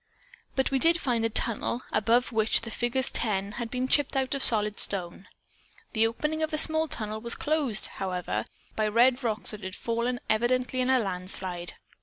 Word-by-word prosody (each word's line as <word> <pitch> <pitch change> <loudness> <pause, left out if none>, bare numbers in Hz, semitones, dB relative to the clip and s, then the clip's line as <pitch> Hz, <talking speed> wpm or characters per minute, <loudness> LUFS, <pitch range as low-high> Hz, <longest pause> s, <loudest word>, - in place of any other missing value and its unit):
But 265 0 0
we 270 - +1
did 335 +4 +3
find 240 -6 -1
a 225 - +1
tunnel 235 +2 -1
above 235 +4 +1
which 220 -1 +2
the 230 -1 -7
figures 240 +3 0
10 200 -3 -1
had 235 - -4
been 255 +1 -2
chipped 290 0 +1
out 265 0 -1
of 275 - -2
solid 210 -3 +2
stone. 185 -1 0 0.7
The 225 0 +3
opening 300 +7 -3
of 315 - 0
the 310 - -2
small 315 +1 +6
tunnel 215 -5 -4
was 235 +1 +4
closed, 290 -8 +1
however, 180 - -3 0.3
by 215 -1 0
red 245 +4 +3
rocks 220 -2 0
that 210 -2 -9
had 190 0 -6
fallen 235 +1 -2
evidently 255 +3 0
in 255 - 0
a 260 - +4
landslide. 185 -3 -4
235 Hz, 185 wpm, -27 LUFS, 210-260 Hz, 0.7 s, small